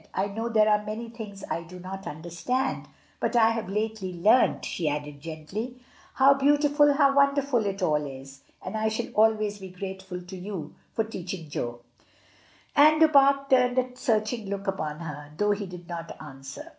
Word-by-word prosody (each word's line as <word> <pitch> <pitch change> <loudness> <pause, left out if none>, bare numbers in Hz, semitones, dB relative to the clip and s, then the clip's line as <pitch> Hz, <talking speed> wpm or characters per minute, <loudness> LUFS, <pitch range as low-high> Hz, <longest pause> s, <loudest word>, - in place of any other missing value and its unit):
"I 190 - +1
know 225 +3 -3
there 215 -2 +4
are 210 0 +3
many 220 +2 -5
things 215 -4 -9
I 170 - -2
do 180 +2 -11
not 190 +2 -7
understand; 170 - -2 0.3
but 230 +1 -1
I 225 -1 +6
have 225 -4 -3
lately 210 -2 -2
learnt," 210 +9 +3
she 165 -4 -1
added, 145 -1 -5
gently, 190 - -6 0.4
"how 275 +1 +7
beautiful, 290 +1 +4
how 275 -1 +4
wonderful 280 -3 +3
it 195 -1 -3
all 150 -3 +2
is; 135 0 -10 0.2
and - - -4
I 220 0 +1
shall 220 +2 -3
always 215 -1 +2
be 190 -1 -8
grateful 190 0 -6
to 180 +2 -9
you 180 -4 -6 0.2
for 225 - +2
teaching 185 -6 -7
Jo." 120 -3 -4 0.9
And 305 +2 +6
Du 320 -1 +7
Pare 275 -1 +5
turned 250 -2 +3
a 255 0 0
searching 220 -4 -1
look 200 0 -4
upon 155 -5 -3
her, 150 -2 -7
though 210 +2 +2
he 205 -1 -2
did 180 -1 -10
not 170 -1 -7
answer. 135 -2 -9
205 Hz, 180 wpm, -27 LUFS, 170-245 Hz, 0.9 s, how